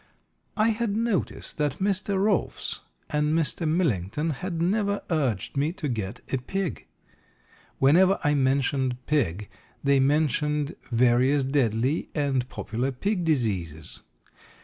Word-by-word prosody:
I 215 +1 +4
had 220 -2 -1
noticed 225 -7 -2
that 145 -2 0
Mr. 195 0 0
Rolfs 200 -1 0 0.3
and 150 +1 +1
Mr. 165 +1 -1
Millington 150 - 0
had 170 +4 -4
never 200 +3 0
urged 135 - 0
me 145 +3 +1
to 170 -5 -4
get 110 -2 -4
a - - +3
pig. 190 +7 -3 0.9
Whenever 180 +8 +5
I 150 -1 +3
mentioned 135 -2 +1
pig 105 - 0 0.4
they 140 -1 +4
mentioned 150 +1 +1 0.2
various 125 +4 +3
deadly 130 0 0
and 135 -4 0
popular 120 +6 -3
pig 180 +8 -1
diseases. 95 - -2
145 Hz, 120 wpm, -26 LUFS, 125-175 Hz, 0.9 s, Whenever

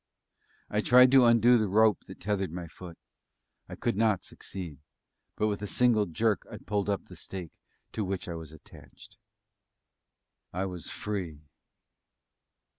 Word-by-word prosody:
I 105 - 0
tried 125 +3 +7
to 135 -2 +7
undo 120 +1 +6
the 110 - +1
rope 105 +1 +3
that - - -11
tethered 95 -3 -1
my 90 0 -5
foot. 85 0 -11 0.7
I - - -7
could - - -1
not 110 -3 +2
succeed; 85 -8 -8 0.6
but 105 - 0
with 105 -1 -1
a 105 - -3
single 115 -2 +3
jerk 105 +5 0
I - - -6
pulled 105 -1 -2
up 100 -2 -1
the - - -13
stake 90 -4 -8 0.4
to 110 - -2
which 95 -1 -3
I 85 - -4
was 80 -2 -8
attached. 80 - -16 1.3
I 95 +2 -2
was 90 -3 -6
free. 90 -8 -5
100 Hz, 150 wpm, -29 LUFS, 90-110 Hz, 1.3 s, tried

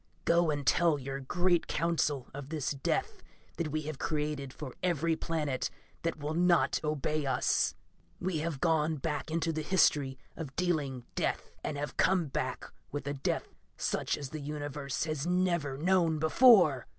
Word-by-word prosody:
Go 170 -1 +4
and 145 -2 -1
tell 170 -1 +4
your 135 0 -5
great 175 +5 +1
Council 155 -5 0
of 140 0 -7
this 155 -4 -2
death 140 -2 -1 0.4
that 170 - -1
we 155 +1 -2
have 150 -2 -5
created 150 -3 -2
for 130 -2 -7
every 165 -2 +1
planet 150 -5 -2 0.3
that 165 -1 -1
will 150 +1 -3
not 175 +1 +3
obey 150 -1 -1
us. 130 - +2 0.4
"We 175 -3 -1
have 155 -3 -3
gone 160 -1 +2
back 150 +2 -3
into 165 0 0
the 155 - -2
history 150 -6 +3 0.2
of 145 -5 -7
dealing 145 -9 -1
death - - -2
and 150 - -3
have 145 +1 -4
come 185 -3 +3
back 130 -1 -3 0.2
with 145 -1 -4
a 140 - -1
death 140 - -2 0.2
such - - -1
as 140 -3 -6
the 155 - -5
Universe 145 -1 -3
has 155 -1 -2
never 175 -6 +1
known 170 0 +3
before! 160 - +6
155 Hz, 165 wpm, -31 LUFS, 140-170 Hz, 0.4 s, before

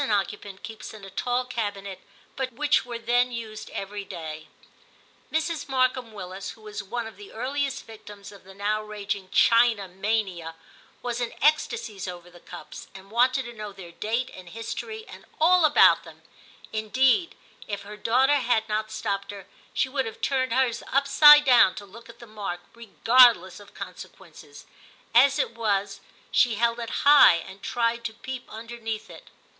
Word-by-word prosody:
occupant 200 -1 -2
keeps 220 -1 -9
in 205 -2 -11
a 195 - -11
tall 245 +5 -1
cabinet, 205 -6 -4 0.4
but 265 -1 -3
which 295 +4 +2
were 240 -1 -6
then 245 +2 +1
used 220 -2 -7
every 200 +1 -6
day. 155 -4 -8 0.8
Mrs. 320 -2 -2
Markham 255 -2 0
Willis, 190 -2 -7
who 220 - -20
was 210 -1 -6
one 230 +4 -4
of 225 - -10
the 410 0 -12
earliest 275 - -3
victims 210 -2 -12
of 200 - -15
the 190 +1 -15
now 210 +2 -1
raging 205 -2 -5
china 230 -3 +4
mania, 185 -4 -2 0.5
was 245 0 -3
in 240 - -2
ecstasies 235 -9 0
over 175 -1 -9
the 175 - -15
cups, - - -11
and 195 +1 -13
wanted 255 +3 +2
to 240 - -8
know 210 -2 -7
their 190 -3 -11
date 230 +8 -2
and 185 -2 -11
history 435 - -6
and - - -12 0.2
all 345 +1 +5
about 300 - +6
them; - - -15 0.5
indeed, 260 - +2 0.3
if 205 -1 -5
her 210 +1 -9
daughter 255 +7 +3
had 235 -4 +1
not 215 0 -2
stopped 205 -2 -3
her, 200 -2 -8 0.3
she - - 0
would 265 -2 -2
have 225 - -8
turned 265 -2 0
hers 250 -1 +1
upside 295 +2 +7
down 245 -8 +6
to 205 - -8
look 230 +4 -14
at 230 - -13
the 235 - -12
mark, 205 -5 -6
regardless 230 -3 +4
of 205 - -16
consequences; - - -11 0.5
as 275 +4 +6
it 280 - 0
was, 205 -3 -1 0.3
she 240 -3 +3
held 235 +2 +1
it 230 -1 -5 0.2
high 290 -11 +8
and 190 +3 -8
tried 235 +1 -1
to 220 -1 -5
peep 255 +1 -8
underneath 225 -1 -6
it. - - -14
225 Hz, 170 wpm, -25 LUFS, 200-255 Hz, 0.8 s, high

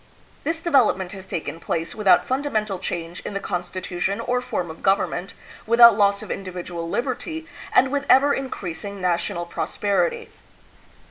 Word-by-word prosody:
This 325 +2 -1
development 240 - +2
has 190 -1 -9
taken 160 0 -4
place 165 0 -3
without 210 -3 +4
fundamental 220 -8 -1
change 170 -1 -5
in 200 - -7
the - - 0
constitution 180 +2 -3
or 250 +2 0
form 175 -8 -3
of 160 - -12
government, 195 0 0 0.3
without 235 -1 +8
loss 200 -1 +2
of - - -7
individual 175 -3 -5
liberty, 260 - -3 0.3
and 260 0 +4
with 285 0 -1
ever 280 +2 +6
increasing 200 -6 -5
na 180 -1 +2
tional 175 0 -4
prosperity. 460 - -1
200 Hz, 145 wpm, -23 LUFS, 180-250 Hz, 0.3 s, without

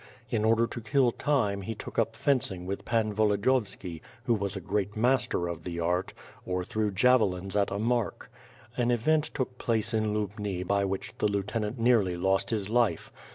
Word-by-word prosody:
In 110 -3 +1
order 115 +1 +4
to 120 - -6
kill 125 +2 +3
time, 115 -9 0
he 110 +3 -4
took - - -5
up 115 0 0
fencing 110 -9 0
with 100 +2 -4
Pan 110 -2 +1
Volodiyovski, 100 -4 0 0.3
rt'ho 120 - +4
was 100 0 -2
a - - -3
great 100 +1 -2
master 120 -7 +2
of 85 -2 -5
the 85 0 -4
art; 90 +2 0 0.3
or 90 0 -2
threw 110 +3 -1
javelins 100 -3 +2
at 100 -1 +2
a 100 - -3
mark. 115 +1 -1 0.4
An 120 -1 +1
event 150 +6 +2
took 125 -2 -4
place 115 0 0
in 110 -1 +1
liubni 105 -3 -3
by 100 +1 +1
which 95 0 -4
the - - +3
lieutenant 105 +3 -2
nearly 115 -7 +3
lost 95 +2 +1
his 105 -4 -1
life. 120 0 +1
105 Hz, 180 wpm, -29 LUFS, 95-120 Hz, 0.4 s, order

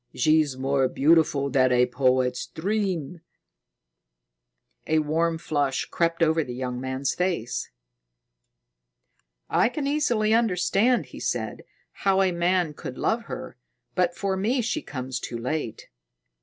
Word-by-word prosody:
She's 155 -1 +2
more 135 0 +1
beautiful 145 -1 +3
than 130 -1 +3
a 125 0 +4
poet's 125 0 +1
dream." 180 -4 -2 1.7
A 160 - +2
warm 160 +2 +1
flush 145 -4 -1
crept 170 0 0
over 160 0 +3
the 125 -3 -7
young 125 -1 -4
man's 130 +1 -1
face. 125 -10 -2 1.8
"I - - +3
can 275 +3 -4
easily 245 -7 +1
understand," 225 +2 +2
he - - -8
said, - - -3 0.3
"how 195 -1 +2
a 185 - +2
man 175 -2 +1
could 130 -3 -8
love 230 +1 0
her, - - -7 0.4
but 175 -1 +1
for 195 -1 -1
me 230 +7 +1
she 270 +7 -1
comes 130 - -5
too 120 - -5
late." 125 0 -4
160 Hz, 130 wpm, -25 LUFS, 130-190 Hz, 1.8 s, a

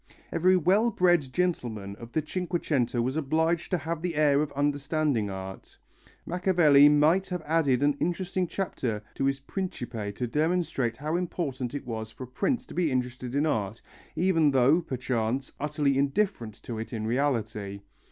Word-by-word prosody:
Every 185 +3 +4
well 195 +7 +3
bred 175 - +2
gentleman 120 - -2
of 115 0 -10
the 155 - 0
Cinquecento 155 -9 -1
was 130 +3 -1
obliged 160 +3 0
to 180 - +1
have 165 +1 -4
the 175 -2 -2
air 145 -1 +4
of 150 -2 -2
understanding 145 -4 0
art. 95 0 -8 0.5
Machiavelli 170 -5 +5
might 155 +6 +4
have 180 -3 -3
added 145 -5 +2
an 145 0 +3
interesting 180 +1 -1
chapter 125 - -3
to 135 - -1
his 135 0 +1
Principe 120 - -4
to 125 - -2
demonstrate 150 -4 0
how 155 +4 -2
important 145 -8 -3
it 145 - -5
was 110 -2 -4
for 120 - -9
a - - -8
prince 140 - -1
to - - -11
be 170 -4 +1
interested 125 0 -3
in 145 +2 +2
art, 110 -7 -1 0.4
even 165 -2 +3
though, 135 +5 +4
perchance, 130 -3 -2
utterly 145 -1 0
indifferent 140 - 0
to 115 -2 -5
it 115 - -6
in 110 -1 -3
reality. 110 -6 -1
145 Hz, 160 wpm, -28 LUFS, 120-170 Hz, 0.5 s, Machiavelli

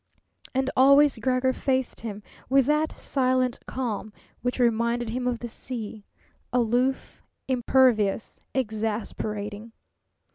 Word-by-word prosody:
And 265 0 +1
always 280 0 +6
Gregor 255 +2 +1
faced 260 -2 -1
him 210 -2 -6 0.3
with 270 0 +5
that 300 +2 0
silent 255 -2 +1
calm 225 -4 -3 0.3
which 245 +1 -1
reminded 235 -1 +1
him 250 +1 -2
of 245 -1 0
the 240 - -6
sea, 220 -3 -7 0.4
aloof, 250 +2 0 0.3
impervious, 245 -5 +2
exasperating. 215 -2 -3
245 Hz, 105 wpm, -26 LUFS, 220-260 Hz, 0.4 s, always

